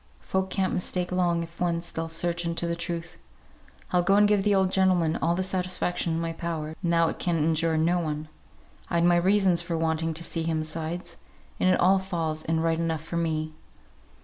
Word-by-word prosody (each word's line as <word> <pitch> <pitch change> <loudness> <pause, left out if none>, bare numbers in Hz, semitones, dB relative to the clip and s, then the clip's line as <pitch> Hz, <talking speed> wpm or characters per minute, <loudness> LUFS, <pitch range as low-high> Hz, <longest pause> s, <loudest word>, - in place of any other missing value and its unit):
Folk 190 0 -2
can't 190 0 0
mistake 180 0 -1
long 175 -2 +1
if 170 +1 -12
once 170 -1 -1
they'll 165 0 -4
search 170 +1 -1
into 170 0 -1
the 170 0 -1
truth. 170 0 -5 0.7
I'll 180 - +3
go 195 +3 +3
and 205 0 +6
give 205 -1 +3
the 205 0 +2
old 190 -1 +2
gentleman 180 -4 +3
all 170 +1 +1
the 185 - -1
satisfaction 180 -2 -1
in 165 - -1
my 165 0 -2
power, 160 -2 -4
now 170 -2 +3
it - - -6
can 175 -2 0
injure 160 +1 +1
no 170 +3 +2
one. 155 -2 -3 0.6
I'd 170 0 +1
my 175 0 +5
own - - -2
reasons 190 -3 +4
for 170 -1 -3
wanting 160 0 0
to 170 - -1
see 165 - -2
him 160 -1 -1
besides, 160 +2 -5 0.4
and 185 - +3
it - - +3
all 190 +2 +5
falls 165 -5 -3
in 160 0 0
right 165 0 +1
enough 165 -2 -1
for 170 +1 -4
me." 155 -2 -1
170 Hz, 205 wpm, -26 LUFS, 165-180 Hz, 0.7 s, and